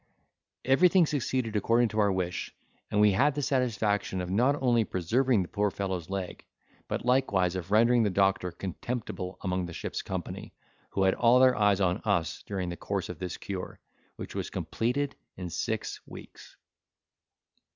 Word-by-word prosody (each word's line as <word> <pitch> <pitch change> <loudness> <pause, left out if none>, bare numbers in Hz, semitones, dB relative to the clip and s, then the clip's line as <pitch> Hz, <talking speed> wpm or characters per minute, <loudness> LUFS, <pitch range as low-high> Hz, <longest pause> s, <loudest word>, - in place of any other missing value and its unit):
Everything 175 +6 +5
succeeded 130 -6 -1
according 115 +4 +3
to 110 - -2
our 100 -1 +4
wish, 90 -2 -3 0.3
and 105 - 0
we 105 0 +6
had 135 +9 +2
the 145 - -1
satisfaction 110 -8 0
of 90 0 -4
not 125 +8 +3
only 120 -3 +3
preserving 110 +5 +1
the - - -8
poor 105 +2 0
fellow's 95 -4 -4
leg, 95 -2 -4 0.4
but - - -3
likewise 100 -9 +2
of 90 -1 -5
rendering 115 +3 +4
the 105 - +2
doctor 95 -1 +1
contemptible 95 0 -5
among 90 -2 -1
the 85 - -8
ship's - - -4
company, - - -6 0.3
who 95 - 0
had 95 0 +4
all 120 +1 +4
their 130 -1 +6
eyes 105 -2 +3
on 95 +1 +1
us 85 -7 0
during 95 -3 -3
the 85 - -4
course 100 +2 -3
of 90 -4 -7
this 90 -1 -4
cure, 95 -2 -6 0.4
which - - -8
was - - -3
completed 135 +5 -2 0.2
in 90 -2 -6
six 105 +6 -3
weeks. - - -12
100 Hz, 165 wpm, -29 LUFS, 95-120 Hz, 0.4 s, we